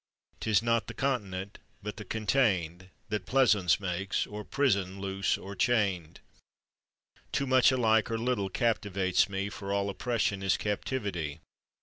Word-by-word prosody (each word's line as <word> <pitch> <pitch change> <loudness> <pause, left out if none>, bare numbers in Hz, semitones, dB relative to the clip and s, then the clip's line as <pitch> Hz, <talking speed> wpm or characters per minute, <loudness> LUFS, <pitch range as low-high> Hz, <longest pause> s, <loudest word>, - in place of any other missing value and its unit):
'Tis 110 0 +2
not 115 0 +1
the - - -7
continent, 100 -7 -2 0.2
but 105 +1 -5
the 110 - -6
contained, 95 -5 0 0.2
That 105 -3 -3
pleasaunce 105 -11 +4
makes 95 0 -1
or 105 0 -7
prison, 100 -8 0
loose 95 0 0
or 100 +1 -8
chained. 100 -9 0 1.1
Too 140 - 0
much 130 -1 +5
alike 110 -3 +3
or 115 - -1
little 115 -4 -1
captives 100 -4 +1
me, 95 0 -2
For 100 -2 -6
all 100 0 0
oppression 110 -3 -1
is 95 -1 +2
captivity. 100 - -3
100 Hz, 135 wpm, -30 LUFS, 95-115 Hz, 1.1 s, much